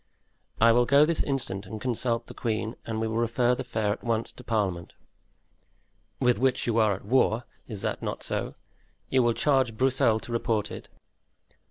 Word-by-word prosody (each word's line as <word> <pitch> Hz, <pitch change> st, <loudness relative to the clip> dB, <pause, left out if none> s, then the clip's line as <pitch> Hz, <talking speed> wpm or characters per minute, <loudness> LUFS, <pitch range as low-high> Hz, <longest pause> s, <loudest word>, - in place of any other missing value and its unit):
"I 115 Hz, +1 st, +6 dB
will 120 Hz, +1 st, +3 dB
go 140 Hz, +3 st, +6 dB
this 165 Hz, 0 st, 0 dB
instant 105 Hz, -8 st, -3 dB
and 110 Hz, +1 st, -6 dB
consult 120 Hz, -1 st, -1 dB
the -, -, -11 dB
queen, 110 Hz, 0 st, -2 dB
and 110 Hz, -1 st, -2 dB
we 110 Hz, -, 0 dB
will 110 Hz, 0 st, -2 dB
refer 120 Hz, +1 st, +2 dB
the 125 Hz, -, -3 dB
affair 110 Hz, -5 st, -1 dB
at 105 Hz, -, -4 dB
once 115 Hz, -1 st, -1 dB
to 125 Hz, -, -13 dB
parliament." 100 Hz, -7 st, -2 dB, 1.3 s
"With 125 Hz, -3 st, +2 dB
which 130 Hz, 0 st, +1 dB
you 115 Hz, -1 st, +1 dB
are 105 Hz, -3 st, +3 dB
at 95 Hz, -, -12 dB
war—is 115 Hz, -2 st, -1 dB
it -, -, -2 dB
not -, -, -4 dB
so? -, -, -2 dB, 0.5 s
You 130 Hz, -, +3 dB
will 120 Hz, -1 st, +3 dB
charge 130 Hz, -2 st, +1 dB
Broussel 125 Hz, -3 st, +2 dB
to -, -, -8 dB
report 115 Hz, -2 st, -1 dB
it. -, -, -8 dB
115 Hz, 180 wpm, -27 LUFS, 110-125 Hz, 1.3 s, I